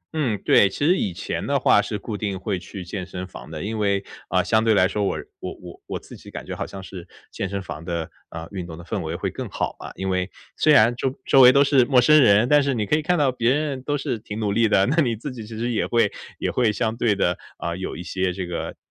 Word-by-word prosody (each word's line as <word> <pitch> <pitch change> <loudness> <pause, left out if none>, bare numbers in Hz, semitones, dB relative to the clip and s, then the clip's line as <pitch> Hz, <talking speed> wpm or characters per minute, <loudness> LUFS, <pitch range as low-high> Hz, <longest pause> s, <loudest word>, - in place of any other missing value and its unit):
嗯， 130 -9 0
对， 100 - +6
其 145 - -2
实 175 +4 +5
以 100 - -1
前 85 - -4
的 - - +2
话 - - +5
是 - - -4
固 105 +2 -6
定 100 -2 -3
会 95 -1 -2
去 95 +1 -9
健 95 +2 -5
身 90 0 -6
房 90 - -11
的。 80 -1 -6
因 110 +1 -3
为 100 -1 +1 0.3
呃， 90 +1 +2
相 110 +1 +2
对 110 -1 +3
来 95 -1 +5
说 105 +1 -2
我 100 - 0 0.2
我 - - -5
我 - - -12
我 - - -4
自 - - -13
己 - - -13
感 - - -8
觉 - - -5
好 - - -4
像 95 -1 -9
是 90 -1 -9 0.2
健 95 - -4
身 100 -1 -4
房 80 -3 -7
的， 85 -2 -4 0.2
呃， 80 0 -7
运 90 -3 -5
动 80 - -8
的 85 - -10
氛 100 +3 -3
围 80 0 -4
会 - - -3
更 - - -6
好 - - -3
吧。 - - -8
因 95 0 -3
为 95 0 0 0.3
虽 155 - +3
然 120 -3 +6
周 130 +2 -2
周 135 - +6
围 125 0 +10
都 140 +2 +5
是 140 -2 +4
陌 130 -1 +4
生 150 +5 +6
人， 110 -1 +5
但 145 +2 +5
是 140 -2 0
你 105 -3 -1
可 125 - +2
以 155 - +1
看 175 +3 +1
到 140 -3 +3
别 120 -1 +1
人 145 -4 -2
都 145 +2 -1
是 120 -4 -3
挺 105 0 -7
努 105 -2 0
力 115 +2 +3
的， 95 -2 +4
那 150 +7 0
你 120 -6 +1
自 125 +6 -6
己 115 -4 -8
其 110 0 -8
实 120 +2 -1
也 115 - 0
会 115 -4 +2 0.3
也 - - -2
会 120 -4 +2
相 110 +1 -1
对 115 -3 +1
地， 90 -3 +1 0.2
呃， 85 0 -3
有 95 -2 -5
一 90 - -6
些 95 +1 -1
这 95 0 -4
个 85 -1 -5
105 Hz, 300 characters per minute, -23 LUFS, 95-125 Hz, 0.3 s, 围